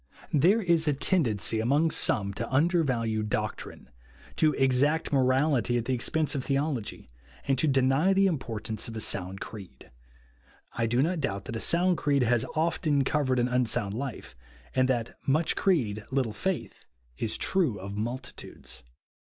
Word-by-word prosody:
^ - - -38 0.3
* - - -27
There 205 +8 +4
is 170 -3 +2
a 150 - +3
tendency 115 - +1
among 145 +8 +2
some 100 -7 +1
to - - -5
undervalue 130 -8 +1
doctrine, 105 - -4 0.5
to 155 - +4
exact 140 +4 +1
morality 130 -1 +2
at 120 - -1
tlie 130 - -1
expense 155 +6 0
of 135 -3 -2
tlieology, 135 - -2 0.4
and 135 - +3
to 155 - +2
deny 135 +6 +3
tlie 195 0 +4
importance 115 - -3
of 115 - -8
a - - -3
sound 95 -2 -3
creed. 95 - -10 0.8
I 115 - -1
do 120 +4 +2
not 170 +2 -1
doubt 100 -9 -3
that 115 - -6
a - - -2
sound 175 +4 +2
creed 140 -3 +2
has 120 -1 +2
often 155 -3 +1
covered 135 -2 0
an 120 0 +2
un 125 -1 +1
sound 100 -2 -1
life, 120 - -6 0.4
and 130 0 +2
tliat 120 -3 -1
" - - -25
much 160 - -1
creed, 115 - +1
little 130 -5 -1
faith," 135 - -4 0.3
is 110 - -1
true 165 - 0
of 100 +2 -7
multitudes. 120 - -7
130 Hz, 170 wpm, -28 LUFS, 110-155 Hz, 0.8 s, There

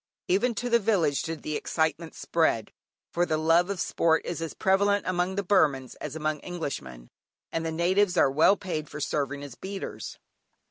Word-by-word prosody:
Even 225 +6 +2
to 245 - -2
the 235 -1 +4
village 185 -10 +2
did 160 -1 -5
the 155 - -3
excitement 160 +2 -1
spread, 160 -10 0 0.4
for 175 - +1
the 155 -3 0
love 165 +3 +3
of 200 -2 -3
sport 160 -1 +1
is 170 -1 -4
as 165 - -5
prevalent 200 +1 +2
among 185 +1 0
the 200 - -1
Burmans 145 -9 +2
as 150 0 -5
among 155 -1 -1
Englishmen; 70 - -6 0.4
and 165 - -2
the 165 - -2
natives 180 +3 +2
are 135 - +5
well 160 +8 +5
paid 155 -6 -4
for 150 - -7
serving 145 -1 -2
as 140 -3 -8
beaters. 195 +7 -6
165 Hz, 180 wpm, -27 LUFS, 150-190 Hz, 0.4 s, are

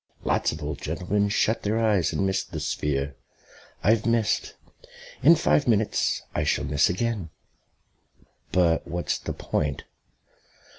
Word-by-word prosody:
Lots - - +1
of 75 0 -7
old 75 -1 -4
gentlemen 95 +6 -1
shut 110 +2 +1
their 105 +2 0
eyes 105 -6 +2
and 100 - 0
miss 95 0 0
the - - -7
sphere. 70 -1 -2 0.7
I've 110 +1 +3
missed. 115 -2 +1 0.7
In 170 - +7
five 150 -3 +2
minutes 110 -2 +1
I - - 0
shall - - 0
miss 75 -1 +2
again." 100 -2 -2 1.2
"But 85 -3 +2
what's 85 0 -2
the - - -5
point?" 70 -3 -2
95 Hz, 135 wpm, -25 LUFS, 80-110 Hz, 1.2 s, In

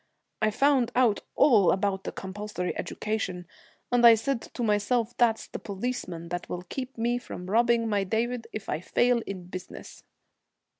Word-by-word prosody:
I 215 - +3
found 260 +1 +2
out 240 -5 +4 0.2
all 215 - +5
about 195 0 -1
the - - -3
compulsory 190 -1 -5
education, 190 -5 -3 0.5
and 245 -1 +3
I 235 -1 +10
said 235 +2 -1
to 245 - -2
myself 225 +2 +1
that's 230 -2 +2
the - - -7
policeman 190 -5 -4
that 175 0 -4
will 180 0 -4
keep 255 +7 -6
me 240 +2 0
from 180 -6 -8
robbing 235 +1 +3
my 205 -2 +1
David 230 +4 -1
if 215 - -6
I 150 - -1
fail 240 +6 +2
in 190 -2 -5
business.' 180 +1 -9
220 Hz, 160 wpm, -27 LUFS, 190-240 Hz, 0.5 s, I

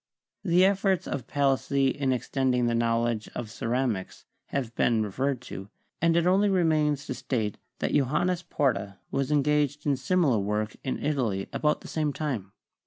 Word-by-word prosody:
The 180 0 +4
efforts 190 -2 +2
of 130 -5 -4
Palissy 140 -1 +2
in 135 -2 0
extending 125 0 +1
the 120 - +1
knowledge 115 -1 0
of 110 -3 -5
ceramics 115 -4 -2 0.2
have 125 -5 -3
been 115 -2 +2
referred 130 +5 -1
to, 95 -5 -8 0.3
and 165 0 +3
it 170 - +2
only 195 +3 +4
remains 155 -6 +2
to - - -3
state 110 -5 -2 0.2
that - - -2
Johannes 155 +6 +1
Porta 120 - -1
was 135 +1 -1
engaged 150 0 +1
in 145 -2 +3
similar 135 - +2
work 105 +2 -2
in 130 - -3
Italy 120 -10 0
about 150 0 +1
the - - -10
same 150 -2 -1
time. 125 -12 -3
135 Hz, 160 wpm, -27 LUFS, 115-150 Hz, 0.3 s, The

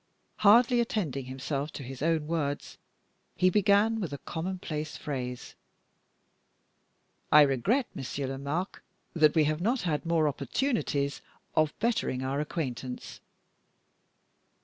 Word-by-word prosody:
Hardly 240 +4 +6
attending 165 - -1
himself 135 +3 -3
to 140 - -6
his 130 +1 -8
own 160 -1 +1
words, 150 -3 -3 0.6
he 185 0 +3
began 205 +3 +3
with 180 -8 -3
a 140 - -4
commonplace 160 -2 -4
phrase: 125 -4 -5 1.8
"I 150 0 +9
regret, 145 - +2
Monsieur 140 +1 -4
Lomaque, 140 +8 -3 0.3
that 155 -2 +4
we 160 - +5
have 155 +2 0
not 235 +6 +1
had 160 -5 -1
more 165 -2 +2
opportunities 140 - -1 0.3
of 155 -1 +2
bettering 220 - 0
our 135 +2 -1
acquaintance." 130 -5 -4
155 Hz, 115 wpm, -29 LUFS, 140-185 Hz, 1.8 s, I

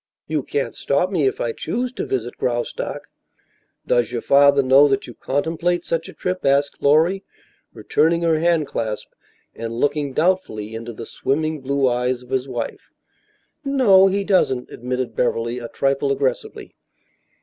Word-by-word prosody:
"You 155 -1 -1
can't 140 +1 -2
stop 160 +7 0
me 160 -8 +2
if - - -2
I 115 - -1
choose 245 - -3
to - - -5
visit 120 -2 -3
Graustark." 120 -1 -2 0.8
"Does 120 -1 +1
your 120 - -3
father 140 0 +5
know 135 +3 +6
that 135 -1 0
you 120 - -10
contemplate 165 +7 -1
such 165 0 -2
a - - -10
trip?" 185 0 -3
asked 140 +1 +1
Lorry, 165 +7 +3 0.5
returning 170 +2 +1
her 165 -2 +2
handclasp 150 -10 0 0.5
and 115 0 -5
looking 145 +3 -1
doubtfully 150 - 0
into 115 +1 -6
the 115 0 -8
swimming 155 +5 -2
blue 140 0 +1
eyes 125 0 0
of 125 - -17
his 130 0 0
wife. 120 -3 -5 0.7
"No, 240 -9 +5
he 200 +1 0
doesn't," 180 -11 +1
admitted 125 +1 -4
Beverly, 115 0 0
a 120 - -6
trifle 140 +2 0
aggressively. 135 -2 -2
140 Hz, 150 wpm, -21 LUFS, 125-165 Hz, 0.8 s, know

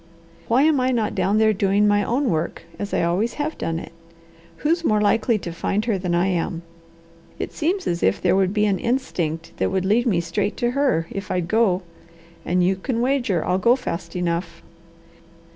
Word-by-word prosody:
Why 245 +4 +3
am 305 -3 +3
I 255 0 +1
not 235 -4 0
down 205 +2 +1
there 220 0 +4
doing 200 +1 +2
my 205 0 +3
own 250 +2 0
work, 160 0 -2 0.2
as 205 - -4
I - - +1
always 185 +8 0
have 300 +1 -2
done 165 0 -3
it? 165 - -8 0.7
Who's 335 +3 +2
more 215 -8 +2
likely 220 +2 +2
to 175 -4 -6
find 205 +5 -1
her 215 -5 0
than 180 -1 -1
I 175 +2 +2
am? 170 -2 -1 0.7
It - - -5
seems 360 +4 -1
as 170 0 -1
if 95 - +2
there - - +2
would 190 -1 +2
be 210 0 +2
an 195 -3 +1
instinct 170 - -2
that - - +1
would 190 -1 0
lead 230 +5 +2
me 190 -7 +2
straight 170 +4 -2
to 240 -1 0
her, 260 - +1
if 195 -1 -6
I'd 180 -2 -1
go. 195 -3 +2 0.6
And 180 +1 +1
you 190 +2 +2
can 230 +4 -2
wager 240 - +1
I'll 185 - +1
go 235 +6 +4
fast 170 -9 -5
enough." 175 0 -2
205 Hz, 200 wpm, -22 LUFS, 175-240 Hz, 0.7 s, there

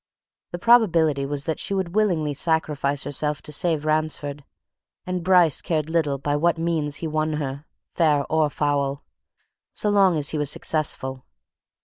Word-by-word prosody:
The 175 - -4
probability 165 - +3
was 145 0 -3
that 160 -2 -2
she 200 - -2
would 185 -3 -2
willingly 175 -9 +1
sacrifice 145 -2 -1
herself 150 +1 -2
to - - -7
save 155 0 +1
Ransford 155 -2 -1 0.6
and 180 -1 -3
Bryce 180 -5 +4
cared 160 -3 -2
little 155 -4 0
by 145 +2 -2
what 170 +2 +1
means 160 -3 -1
he 165 - -2
won 155 0 -1
her, 145 0 -5 0.3
fair 150 -4 +2
or 155 -1 +1
foul, 140 -1 -1 0.7
so 210 - 0
long 195 -4 +4
as 150 -1 0
he 155 - -2
was 145 -2 +1
successful. 135 -4 -1
155 Hz, 155 wpm, -23 LUFS, 145-170 Hz, 0.7 s, Bryce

